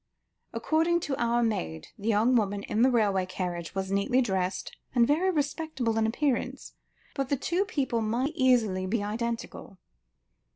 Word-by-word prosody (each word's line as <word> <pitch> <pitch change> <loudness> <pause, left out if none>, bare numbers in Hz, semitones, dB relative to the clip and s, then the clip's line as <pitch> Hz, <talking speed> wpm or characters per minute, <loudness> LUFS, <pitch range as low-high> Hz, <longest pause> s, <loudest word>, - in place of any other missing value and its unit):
According 330 +2 +1
to 285 -4 -2
our 235 0 +1
maid, 80 - -2
the 205 - -7
young 225 +3 +3
woman 205 -3 +1
in 215 - -1
the 255 - +6
railway 200 -6 +2
carriage, 180 -2 -4
was 190 0 -2
neatly 200 +6 +2
dressed 190 -6 -1 0.2
and 240 -1 +5
very 320 +8 +2
respectable 290 -6 -1
in 220 - +2
appearance, 265 +3 -1 0.4
but 275 -2 -2
the 280 - +1
two 355 +9 0
people 270 - -1
might 235 +6 0
very - - -22
easily 225 -9 +2
be 205 +2 0
identical." 225 -2 -4
235 Hz, 160 wpm, -28 LUFS, 200-270 Hz, 0.4 s, the